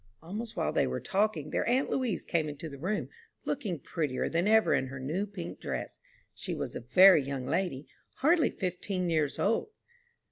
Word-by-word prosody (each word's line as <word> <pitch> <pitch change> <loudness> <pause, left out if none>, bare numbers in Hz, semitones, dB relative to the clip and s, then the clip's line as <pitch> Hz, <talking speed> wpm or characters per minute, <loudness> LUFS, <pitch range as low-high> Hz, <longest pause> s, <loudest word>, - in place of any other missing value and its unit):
'" 110 - -29
Almost 215 +7 -6
while - - 0
they - - +2
were - - -2
talking, 195 -7 0
their - - 0
aunt 255 +3 +2
Louise 250 -7 -1
came 160 -3 0
into 150 +3 -6
the 140 -3 -9
room, 195 +7 -1 0.4
looking 215 - -2
prettier 145 -2 -2
than 170 +4 +1
ever 220 +1 +5
in 130 - +1
her 130 +1 -7
new 160 +10 -2
pink 190 -4 -7
dress. - - -5 0.3
She - - -4
was - - -4
a - - -3
very 180 +8 +7
young 135 -1 -4
lady, 165 -4 -1 0.3
hardly 320 +3 +3
fifteen 180 -1 -2
years 155 -3 +1
old. 225 - +1
180 Hz, 185 wpm, -30 LUFS, 150-210 Hz, 0.4 s, very